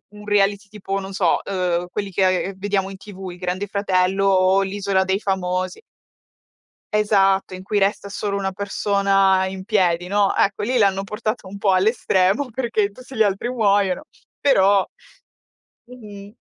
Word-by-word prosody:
un 210 - -12
reality 205 0 +1
tipo, 195 -1 -4
non 190 - -7
so, 190 -3 +1
uhm, 180 -2 -1
quelli 200 0 -4
che 185 +1 +1
vediamo 195 0 -1
in 195 - -8
TV, 190 -2 -9
il 175 - -11
Grande 185 +2 -3
Fratello 195 -1 +1
o 190 0 +4
l'Isola 195 -1 0
dei 190 +1 0
Famosi. 185 - -2 1.1
Esatto, 195 -3 +2
in 185 0 -7
cui 205 +2 -1
resta 200 +1 0
solo 200 0 -3
una 190 -1 -2
persona 195 -1 +1
in 190 0 -6
piedi, 180 -4 +1
no. 200 +1 +1
Ecco 200 +1 +1
lì 250 +3 0
l'hanno 195 -2 +2
portata 215 0 -4
un 200 +1 -9
po' 200 -1 +2
all' 185 +1 +2
estremo, 210 +2 +1
perché 230 -4 0
tutti 255 +5 -13
gli 220 - +3
altri 205 +3 -1
muoiono, 200 -6 +1 0.4
però 200 -8 +4 1.0
Mh-mh. 210 -4 -12
195 Hz, 155 wpm, -21 LUFS, 190-205 Hz, 1.1 s, o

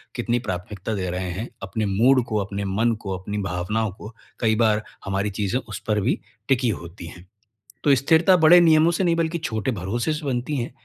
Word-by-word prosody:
कितनी 120 0 0
प्राथमिकता 95 +3 -4
दे 95 -2 -2
रहे 90 +1 -3
हैं, 100 +7 -4 0.2
अपने 100 +3 -2
मूड 120 +6 +3
को, 110 -2 -1
अपने 100 0 -4
मन 110 +5 +1
को, 95 -1 -3
अपनी 100 +3 -5
भावनाओं 95 +4 -2
को 105 +2 -10 0.3
कई 110 -2 +2
बार 110 -1 +2 0.2
हमारी 100 +1 -1
चीज़ें 105 +4 -1
उस 105 -3 -6
पर 105 -1 +2
भी 115 +7 0 0.3
टिकी 130 -2 +2
होती 85 -4 -6
हैं। 90 +2 -12 0.6
तो 145 - +5
स्थिरता 160 +7 +4
बड़े 165 +2 +7
नियमों 160 0 +5
से 190 - 0
नहीं 170 -2 +2
बल्कि 165 0 0
छोटे 125 -6 -2
भरोसे 110 - -2
से 150 0 -5
बनती 130 +2 -2
है। 120 -1 -3
110 Hz, 200 wpm, -23 LUFS, 95-135 Hz, 0.6 s, बड़े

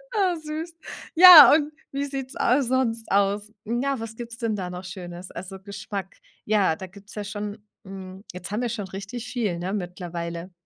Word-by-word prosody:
Oh, 375 -4 +2
süß. 315 +2 -5 0.4
Ja, 335 -7 +11
und 300 -1 +2 0.2
wie 280 +1 -2
sieht's 270 -2 -6
a 260 +4 +3
sonst 240 -3 -1
aus? 200 +1 +1
Ja, 250 +3 -1
was 225 0 -7
gibt's 235 -1 -8
denn 230 -3 -1
da 185 -3 -4
noch 180 +1 -7
Schönes? 175 0 -8
Also 190 +3 -8
Geschmack 200 -1 -7 0.3
ja, 200 -6 +2
da 190 - -8
gibt's 200 +3 -15
ja 210 - -4
schon, 205 0 -6 0.2
hm 190 0 -9
jetzt 180 +1 -8
haben 215 +4 -1
wir 240 - -1
schon 210 -4 -4
richtig 205 +5 -7
viel, 225 -9 -2
ne, 185 +3 -3
mittlerweile. 175 -2 -5
210 Hz, 180 wpm, -25 LUFS, 190-245 Hz, 0.4 s, Ja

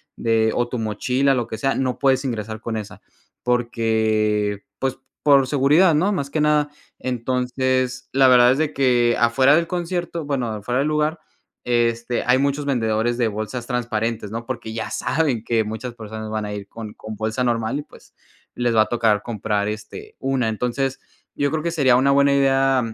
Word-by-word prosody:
de 110 -1 +1
o 120 - +1
tu 125 - -3
mochila, 125 +6 +1
lo 120 -3 -1
que 110 - -5
sea, 135 +5 0
no 130 -2 -1
puedes 135 -1 +2
ingresar 110 -4 -4
con 115 -1 -3
esa, 105 -2 -8 0.4
porque, 110 -4 +1 0.2
pues, 135 -1 -1 0.3
por 140 -3 +5
seguridad, 150 +6 +4
¿no?, 190 +7 +2
más 140 -7 -2
que 155 - -2
nada. 150 -1 +2 0.3
Entonces 130 +1 -1
la 135 0 +5
verdad 125 -1 +7
es - - -3
de 155 -1 0
que 120 -3 +3
afuera 130 +4 +4
del 170 +1 +1
concierto, 175 -1 -3
bueno, 135 -4 -1
afuera 110 +4 -2
del 140 - +1
lugar, 155 +1 0 0.5
este 120 0 0
hay 125 +1 +5
muchos 140 +1 0
vendedores 120 -3 0
de 120 -2 +2
bolsas 110 +3 -4
transparentes, 115 -3 -2
¿no?, 115 +2 -5
porque 120 -3 -5
ya 110 -1 -4
saben 140 -9 0
que 115 -1 +1
muchas 110 +3 -6
personas 110 -1 -7
van 110 -1 -3
a 105 - -5
ir 100 -1 -7
con 110 0 -9
con 110 0 -8
bolsa 110 +4 -2
normal 115 +2 0
y - - -6
pues - - -19 0.4
les 120 -1 0
va 110 - +6
a - - -6
tocar 110 -3 +2
comprar 105 -2 -2
este 105 0 -7
una. 135 -3 0
Entonces 125 +4 -2 0.4
yo 145 - +1
creo 160 -1 -2
que 170 - -1
sería 135 -7 +4
una 135 +2 +3
buena 140 0 +4
idea 135 -1 +3
125 Hz, 185 wpm, -22 LUFS, 110-135 Hz, 0.5 s, verdad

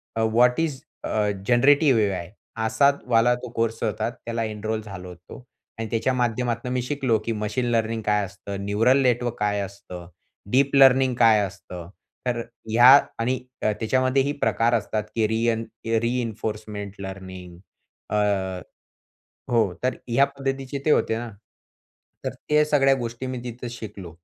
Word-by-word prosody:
A, 115 - 0
VAT 120 +4 +3
is 150 -5 -1 0.2
a 105 -1 0 0.2
generative 135 +1 +5
AI? 95 -4 -2 0.3
असा 140 +5 +4 0.2
वाला 120 0 +4
तो 125 0 -8
कोर्स 115 0 -1
होता, 110 0 -1
त्याला 115 -1 -5
एनरोल 110 0 -3
झालो 95 -4 -9
होतो 90 0 -12 0.4
आणि 115 - -3
त्याच्या 115 +4 0
माध्यमातून 120 0 -1
मी 125 - 0
शिकलो, 130 -3 0
की 115 - -1
मशीन 105 +3 -2
लर्निंग 115 -1 0
काय? 105 -1 +2
असतं 100 +1 -7
न्यूरल 115 +7 +3
नेटवर्क 120 -1 +1
काय 105 -1 0
असतं? 95 -3 -8 0.4
डीप 140 +2 +3
लर्निंग 130 -1 +6
काय 115 -3 +6
असतं? 90 -3 -9 0.4
तर 120 -1 0 0.3
ह्या 120 +3 +7 0.3
आणि 125 +2 0 0.2
अ, 110 - +2
त्याच्यामध्ये 130 +3 +2
ही 140 - -1
प्रकार 115 +1 +2
असतात, 105 -1 -1
की 110 -2 +2
रियन 115 +1 0 0.4
रिइन्फोर्समेंट 110 -4 -3
लर्निंग 95 -2 -8 0.6
अ 95 -3 0 0.9
हो, 110 -6 +3
तर 130 +1 +1
ह्या 120 +4 +4
पद्धतीचे 135 0 -4
ते 155 - +2
होते 110 - +2
ना. 120 0 -5 1.0
तर - - -1
त्या 150 0 +1
सगळ्या 135 -3 +4
गोष्टी 120 0 -5
मी 130 -1 -4
तिथे 120 0 -6
शिकलो 105 -6 -8
115 Hz, 150 wpm, -24 LUFS, 105-125 Hz, 1.0 s, ह्या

